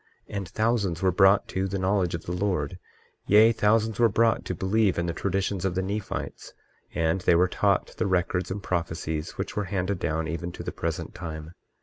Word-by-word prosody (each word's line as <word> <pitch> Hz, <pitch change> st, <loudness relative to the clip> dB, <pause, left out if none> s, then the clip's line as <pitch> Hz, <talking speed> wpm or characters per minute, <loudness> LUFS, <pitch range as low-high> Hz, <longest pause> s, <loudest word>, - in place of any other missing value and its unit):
23:5 -, -, -6 dB
And 95 Hz, -3 st, -4 dB
thousands 110 Hz, -7 st, 0 dB
were 95 Hz, -, +4 dB
brought 95 Hz, +2 st, +4 dB
to 95 Hz, +1 st, -1 dB
the 100 Hz, +1 st, -3 dB
knowledge 95 Hz, -2 st, +1 dB
of 85 Hz, -, -7 dB
the -, -, -4 dB
Lord, 90 Hz, -3 st, -1 dB, 0.5 s
yea, 110 Hz, +3 st, +7 dB
thousands 110 Hz, 0 st, +1 dB
were 115 Hz, -1 st, +5 dB
brought 115 Hz, +1 st, +2 dB
to 90 Hz, -, -3 dB
believe 95 Hz, +2 st, +1 dB
in 85 Hz, -, 0 dB
the 85 Hz, -, -2 dB
traditions 95 Hz, +1 st, -1 dB
of 95 Hz, -2 st, -1 dB
the 95 Hz, -, 0 dB
Nephites; 100 Hz, +1 st, -5 dB, 0.4 s
and 80 Hz, +3 st, +1 dB
they 90 Hz, -, +4 dB
were 90 Hz, +2 st, +4 dB
taught 100 Hz, +1 st, +1 dB
the 110 Hz, -, 0 dB
records 90 Hz, 0 st, 0 dB
and 95 Hz, +1 st, -4 dB
prophecies 80 Hz, -3 st, -3 dB
which -, -, -4 dB
were 105 Hz, -, -1 dB
handed 95 Hz, 0 st, -2 dB
down 80 Hz, 0 st, -1 dB
even 85 Hz, +2 st, -4 dB
to -, -, -7 dB
the -, -, -4 dB
present -, -, -4 dB
time. 80 Hz, -2 st, -7 dB
95 Hz, 205 wpm, -26 LUFS, 85-100 Hz, 0.5 s, yea